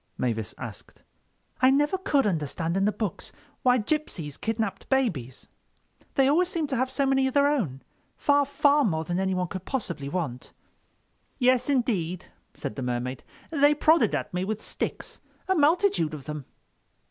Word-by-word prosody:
Mavis 115 -5 -2
asked. - - -10 0.6
"I 260 - +7
never 295 +6 +3
could 290 -7 +1
understand 165 -2 -1
in 195 0 +2
the 210 - +3
books 210 -4 -4 0.3
why 250 -2 +4
gypsies 210 - -2
kidnapped 220 -2 -3
babies. 170 - -1 0.7
They 270 -1 +4
always 340 +6 +3
seem 330 -4 -1
to - - +2
have 260 +1 0
so 275 +1 0
many 270 0 +3
of 265 - -4
their 285 0 +5
own—far, 285 - -1
far 290 0 +3
more 160 -8 0
than 175 +3 -2
anyone 185 -1 0
could 185 -2 -6
possibly 170 - -3
want." 145 -8 -4 0.8
"Yes, 255 0 +3
indeed," 195 - 0 0.3
said - - -5
the - - -3
Mermaid, 125 0 -3 0.3
"they 290 -1 +4
prodded 315 +2 +4
at - - -4
me 180 +1 -1
with 215 +2 -3
sticks—a 380 - -4
multitude 305 - +2
of 145 - -9
them." 150 -3 -6
225 Hz, 155 wpm, -26 LUFS, -, 0.8 s, I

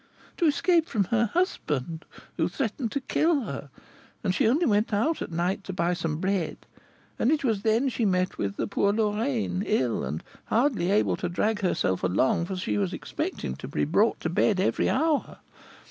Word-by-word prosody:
"To 340 - +3
escape 330 +2 +3
from 210 -4 +1
her 235 0 +3
husband, 165 - -2 0.3
who 165 -1 +1
threatened 225 +5 -2
to 280 - -1
kill 315 +2 +2
her; 140 - -6 0.5
and 185 -3 +1
she 240 +4 +2
only 295 +9 +3
went 210 0 +2
out 255 +11 +1
at - - -4
night 175 +4 -1
to 190 - -5
buy 175 0 +1
some 165 -3 -2
bread, 185 -2 -1 0.6
and 235 - +3
it 310 -2 +1
was 220 -6 +1
then 225 +5 +2
she 245 -2 -1
met 185 -3 +1
with 100 0 -2
the - - -1
poor 200 0 +1
Lorraine, 215 -1 0
ill, 130 - 0
and 75 +5 -4 0.2
hardly 230 -7 +1
able 205 +2 +2
to 180 - -3
drag 210 +5 0
herself 135 - 0
along, 100 - +2
for 190 +1 -4
she 105 - -1
was 95 -3 -1
expecting 65 - -4
to - - -7
be 140 - -1
brought 200 +9 +2
to 160 - -1
bed 185 +2 +2
every 190 - +1
hour. 305 +1 +1
200 Hz, 190 wpm, -27 LUFS, 170-235 Hz, 0.6 s, To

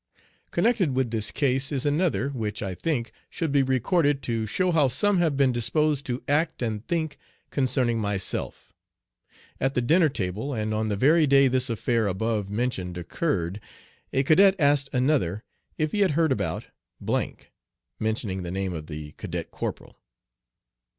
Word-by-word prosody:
Connected 200 - +1
with 130 -3 0
this 110 -2 0
case 135 -1 +1
is 135 -2 -1
another, 150 -1 +1
which, 110 -6 -4
I 95 -2 -3
think, 125 - -2 0.2
should 165 -4 -2
be 140 -1 +4
recorded, 140 - +1
to 115 -2 -1
show 185 - +1
how 155 -5 +4
some 185 +10 +2
have 160 -5 +1
been 135 -2 +4
disposed 140 +5 +1
to 125 0 -3
act 155 -1 +1
and 110 -2 -2
think 160 -3 -2 0.3
concerning 125 -4 +1
myself. 100 -3 -3 0.9
At 135 +1 0
the - - +3
dinner 160 +5 +4
table, 110 +4 -3
and 110 -1 -2
on 110 +1 0
the 105 - 0
very 150 +7 +4
day 140 0 +6
this 130 0 0
affair 115 -1 0
above 105 +1 -1
mentioned 100 -5 -2
occurred, 90 - -2 0.5
a 135 - +2
cadet 190 +7 +5
asked 140 -3 +3
another 125 - +1 0.3
if 155 -1 0
he 210 - -1
had 185 -7 +2
heard 160 -3 +3
about, 130 - -1 1.3
mentioning 110 -3 -2
the 90 - -5
name 95 0 -2
of 80 -2 -6
the 75 -1 -7
cadet - - -5
corporal. - - -6
130 Hz, 155 wpm, -26 LUFS, 110-150 Hz, 1.3 s, day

